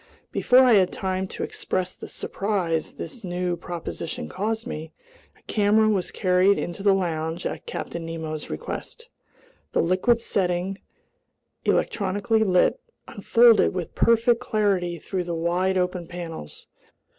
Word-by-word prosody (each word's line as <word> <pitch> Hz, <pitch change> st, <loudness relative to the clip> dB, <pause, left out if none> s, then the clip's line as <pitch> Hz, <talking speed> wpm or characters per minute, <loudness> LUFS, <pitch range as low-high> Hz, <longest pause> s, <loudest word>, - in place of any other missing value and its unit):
Before 255 Hz, +1 st, +5 dB
I 250 Hz, -2 st, +6 dB
had 190 Hz, -3 st, +4 dB
time 190 Hz, 0 st, -2 dB
to -, -, -5 dB
express 185 Hz, -1 st, -3 dB
the -, -, -9 dB
surprise 185 Hz, -6 st, -2 dB
this 245 Hz, -4 st, -7 dB
new 180 Hz, -1 st, -1 dB
proposition 170 Hz, -2 st, -5 dB
caused 220 Hz, +4 st, -2 dB
me, 160 Hz, -8 st, -6 dB, 0.4 s
a -, -, -28 dB
camera 215 Hz, +1 st, +3 dB
was 190 Hz, -4 st, 0 dB
carried 185 Hz, +1 st, +3 dB
into 175 Hz, +3 st, -4 dB
the 200 Hz, -1 st, +4 dB
lounge 165 Hz, -2 st, -2 dB
at -, -, -4 dB
Captain 170 Hz, -, -5 dB
Nemo's 160 Hz, -2 st, -5 dB
request. 470 Hz, +1 st, -6 dB, 0.6 s
The -, -, +3 dB
liquid 185 Hz, +7 st, +2 dB
setting, 185 Hz, -2 st, -1 dB, 0.9 s
electrically 205 Hz, +3 st, +1 dB
lit, 185 Hz, -, +3 dB, 0.3 s
unfolded 230 Hz, -6 st, +4 dB
with 180 Hz, -3 st, -4 dB
perfect 230 Hz, +1 st, +3 dB
clarity 200 Hz, -7 st, 0 dB
through 180 Hz, +3 st, -4 dB
the 170 Hz, -1 st, -3 dB
wide 180 Hz, +3 st, +1 dB
open 180 Hz, -1 st, -1 dB
panels. 165 Hz, -, -8 dB
185 Hz, 135 wpm, -25 LUFS, 175-210 Hz, 0.9 s, I